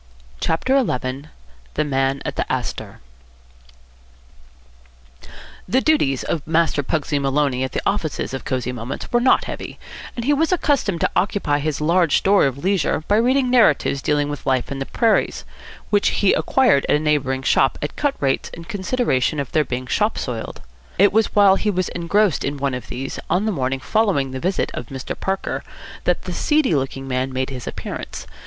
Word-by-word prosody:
CHAPTER 260 - +1
XI 130 - -3 0.5
THE - - +1
MAN 135 -1 0
AT - - -3
THE - - -2
ASTOR - - -4 2.7
The 260 - +3
duties 205 - +2
of 160 - -2
Master 160 -2 +2
Pugsy 145 +1 -1
Maloney 135 -2 +1
at 130 - -4
the - - -2
offices 160 -9 -1
of 135 - -4
Cosy 125 -1 -2
Moments 125 +1 -6
were 240 - +3
not 255 - +4
heavy; - - -6 0.4
and 235 - -4
he 290 - +3
was 315 +4 +1
accustomed 280 - +1
to - - +1
occupy 180 -6 +1
his 150 0 -2
large 170 +1 +3
store 195 -6 +4
of 135 -1 -4
leisure 170 -2 0
by 205 - +3
reading 255 +2 +2
narratives 155 - +3
dealing 145 0 +1
with 145 -2 -6
life 130 0 +1
in 140 - -4
the 135 - -4
prairies, 230 -2 +1 0.5
which 205 -1 +3
he 200 - +3
acquired 250 - +3
at - - +5
a - - +2
neighbouring 140 -4 0
shop 135 0 +3
at 145 - -4
cut 290 -2 0
rates 135 -1 0
in 170 - -9
consideration 185 - 0
of 140 -3 -4
their 155 - +3
being 130 -2 -4
shop 210 - 0
soiled. 115 -3 -5 0.3
It 200 +2 +5
was 220 +1 +2
while 200 -2 +6
he 215 - -1
was 185 -3 0
engrossed 180 +2 +1
in 145 +1 -2
one 140 -1 -1
of 125 -1 -5
these, 135 +2 -5
on 180 +5 +1
the 220 - +1
morning 135 -5 -1
following 190 -12 +1
the 130 - -5
visit 185 +6 -1
of - - -6
Mr. 135 -2 -5
Parker, 190 0 -2 0.4
that - - +1
the - - -5
seedy 300 - +2
looking 135 -1 -2
man 130 0 -1
made 130 +1 -2
his 125 -2 -7
appearance. - - -6
150 Hz, 180 wpm, -21 LUFS, 135-205 Hz, 2.7 s, while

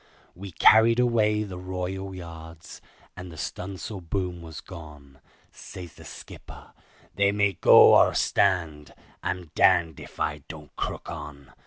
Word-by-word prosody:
We 95 +2 -10
carried 115 +6 +5
away 110 -3 +2
the 95 -3 -8
royal 95 +1 -5
yards, 80 -1 -11 0.3
and 90 -1 -9
the 80 - -12
stun'sle 95 +4 -6
boom 90 0 -4
was 80 -2 -9
gone, 75 -6 -13 0.3
Says 90 -3 -11
the - - -15
skipper, - - -12 0.4
"They 100 0 +2
may 105 -1 +1
go - - +7
or - - +5
stand; 85 -6 0 0.3
I'm 90 -3 -5
darned 80 -3 +3
if - - -13
I 75 -1 -2
don't 75 -3 -12
crook - - -5
on. 75 -4 -10
90 Hz, 140 wpm, -25 LUFS, 80-100 Hz, 0.4 s, go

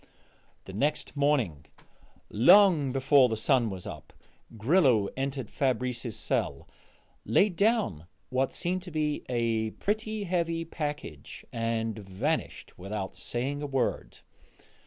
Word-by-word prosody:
The 95 - -10
next 145 +11 -1
morning, 130 - +1 0.6
long 150 - +6
before 135 0 +4
the 110 - -2
sun 120 +1 +2
was 95 -3 -6
up, - - -9 0.4
Grillo 125 - +3
entered 135 -3 -3
Fabrice's 125 -3 -1
cell, - - -2 0.6
laid 195 -3 +3
down 200 - +1 0.2
what 130 +1 +1
seemed 185 +1 -2
to 180 - -9
be 150 -1 -1
a 115 -2 0
pretty 215 0 -2
heavy 170 -3 -1
package, 145 - -6
and 115 -1 -2
vanished 105 - -3
without 95 +1 -5
saying 135 +4 -3
a 145 - -3
word. 135 -2 -2
135 Hz, 115 wpm, -28 LUFS, 110-160 Hz, 0.6 s, long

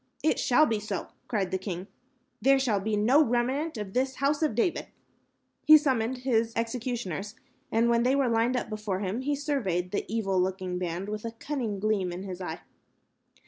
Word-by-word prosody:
"It 310 - +2
shall 280 +5 +4
be 225 -6 0
so," 215 - -4 0.2
cried 200 -5 -1
the 190 - 0
king. 185 -1 -5 0.6
"There 275 +1 +5
shall 240 -7 +1
be 210 +2 -1
no 255 +9 +5
remnants 260 +5 0
of 205 -2 -5
this 260 +1 0
House 285 +2 +1
of 305 -9 +1
David." 280 +9 0 0.8
He 310 0 +11
summoned 255 -4 0
his 230 -3 +2
executioners, 230 -4 -3 0.4
and 230 +1 +3
when 235 0 +3
they 255 +3 +3
were 275 -2 +2
lined 235 +2 +2
up 245 - -2
before 210 -3 -3
him, 205 +5 -2
he 290 +2 0
surveyed 210 - -1
the 205 - -3
evil 195 -5 +1
looking 185 -1 -2
band 180 +2 -3
with 210 0 -4
a 230 -1 -5
cunning 230 -5 -3
gleam 200 -3 0
in 180 +2 -6
his 190 -1 -6
eye. 180 - -5
225 Hz, 185 wpm, -28 LUFS, 195-260 Hz, 0.8 s, He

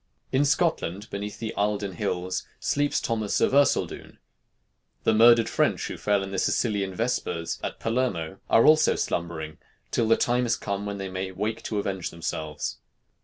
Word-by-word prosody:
In 135 +2 +3
Scotland, 140 - 0
beneath 100 +1 -5
the 115 - -4
Eilden 100 -1 -1
hills, 90 -2 -2
sleeps 145 0 +1
Thomas 110 -3 -1
of - - +2
Erceldoune; 140 0 +1 0.9
the - - +3
murdered 115 +1 +6
French - - 0
who - - -5
fell 100 -1 +1
in 95 - -6
the 95 - -1
Sicilian 100 -5 0
Vespers 90 -8 -2
at - - -4
Palermo 100 -8 -1
are 115 - +5
also 155 0 +5
slumbering 80 -2 -3 0.3
till 115 - +1
the 115 - +5
time 125 0 +1
is 115 - +2
come 100 0 -4
when 100 0 -4
they 95 -1 -4
may 95 0 -3
wake 110 +4 -3
to 110 - -2
avenge 95 -3 -2
themselves. 80 -5 -4
105 Hz, 165 wpm, -26 LUFS, 95-115 Hz, 0.9 s, murdered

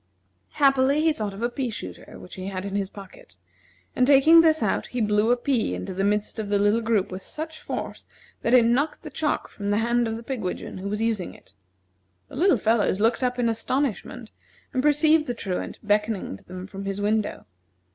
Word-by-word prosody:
Happily, 275 0 +3
he 320 0 +3
thought 215 -6 -3
of 215 - -6
a 240 - +1
pea 255 0 -2
shooter 220 - -8
which 180 - -12
he 185 0 -6
had 190 -1 -4
in 200 - -5
his 195 -2 -1
pocket, 195 - -13 0.6
and 250 - +3
taking 290 +4 +7
this 315 -1 +3
out - - 0
he 250 - -4
blew 210 0 +2
a 245 - +4
pea 240 - 0
into 90 - -5
the 195 +2 -2
midst 210 +2 0
of 210 -2 -4
the 205 - +2
little 205 +3 +2
group 220 -5 0
with 185 +1 -6
such 315 +6 -6
force - - -6 0.3
that 235 - +3
it 240 -2 +6
knocked 275 +6 +1
the - - -8
chalk 305 -2 -1
from 205 -1 -6
the 205 - +2
hand 235 +1 +1
of 225 - -3
the 230 - -9
pigwidgeon 220 -7 -4
who 195 +2 -4
was 210 +2 -2
using 220 -5 -2
it. - - -20 0.8
The - - -11
little 365 +7 +4
fellows 220 -3 +1
looked 230 +4 +2
up 250 0 0
in 245 -1 +1
astonishment, 230 +2 -2 0.4
and 255 - +1
perceived 305 +2 +3
the 245 - -2
Truant 190 -5 -4
beckoning 210 - 0
to - - -16
them 185 0 -8
from 195 0 -8
his 195 0 -3
window. 210 +1 -1
225 Hz, 210 wpm, -25 LUFS, 200-260 Hz, 0.8 s, taking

